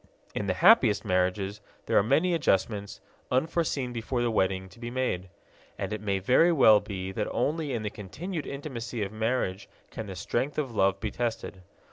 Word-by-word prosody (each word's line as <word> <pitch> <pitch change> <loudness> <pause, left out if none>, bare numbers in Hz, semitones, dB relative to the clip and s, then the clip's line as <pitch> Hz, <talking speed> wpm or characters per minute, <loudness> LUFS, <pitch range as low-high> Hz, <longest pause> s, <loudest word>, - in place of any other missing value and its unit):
In - - -3
the - - 0
happiest - - +5
marriages 95 +3 0 0.2
there - - -1
are - - +7
many 155 - +2
adjustments, 105 - 0 0.3
unforeseen 135 -2 0
before 120 +1 -2
the 120 - +1
wedding, 95 -2 0
to 115 - -17
be 120 0 -5
made. 120 -8 -2 0.5
And - - -3
it 110 - -4
may 100 -2 0
very 125 - +4
well 110 -9 +7
be 95 -3 -5
that 105 +2 -2
only 150 +3 -1
in 115 -4 -2
the 105 - -3
continued 155 - -6
intimacy 125 -5 -4
of 100 - -4
marriage 110 -3 -1 0.2
can 110 - -6
the 95 - -6
strength 120 +9 -2
of 135 -6 -2
love 95 -2 +2
be 110 -1 -3
tested. 115 -5 -3
110 Hz, 180 wpm, -28 LUFS, 100-130 Hz, 0.5 s, are